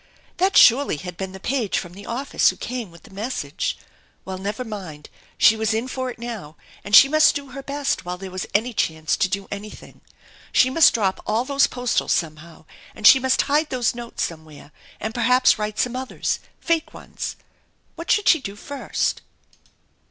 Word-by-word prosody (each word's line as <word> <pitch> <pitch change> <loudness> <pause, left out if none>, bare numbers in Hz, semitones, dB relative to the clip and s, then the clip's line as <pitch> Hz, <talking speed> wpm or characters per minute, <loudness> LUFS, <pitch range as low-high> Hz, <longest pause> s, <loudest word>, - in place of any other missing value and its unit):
That 380 +2 +2
surely 245 - +6
had 180 +3 -8
been 190 +1 -5
the 190 - -10
page 235 -1 -1
from 175 -1 -5
the 200 +2 -11
office 260 +4 +1
who - - -5
came 245 -5 -5
with 170 0 -17
the - - -16
message? 220 +7 -3 0.5
Well, 190 -1 -6
never 205 +5 -4
mind, 185 -9 -8 0.3
she 220 - +6
was 220 0 0
in 230 +3 -2
for 260 0 -3
it 245 - -8
now, 225 -10 -7 0.3
and 205 +2 +2
she 275 - +10
must 310 +2 +4
do 280 -2 -5
her 275 - -7
best 280 +1 -2
while 180 0 -5
there 190 0 -8
was 185 0 -5
any 235 +4 +1
chance 160 -5 0
to 195 - +1
do 195 +1 -3
anything. 205 +1 -9 0.5
She 255 - +4
must 320 -1 +5
drop 195 -4 0
all 225 +3 0
those 280 0 +3
postals 245 -1 -1
somehow, 160 0 -4 0.3
and 210 - -6
she 265 - +9
must 260 0 +2
hide 295 +2 +1
those 250 -3 0
notes 235 -1 -5
somewhere, 155 -3 -8 0.3
and 220 +1 -4
perhaps 250 0 +3
write 210 0 -3
some 250 +2 0
others, 260 0 -3 0.2
fake 335 -2 -1
ones. - - -6 0.6
What 335 +1 -8
should 415 - +2
she 320 - +5
do 200 -5 -7
first 280 +6 -3
225 Hz, 190 wpm, -22 LUFS, 190-260 Hz, 0.6 s, she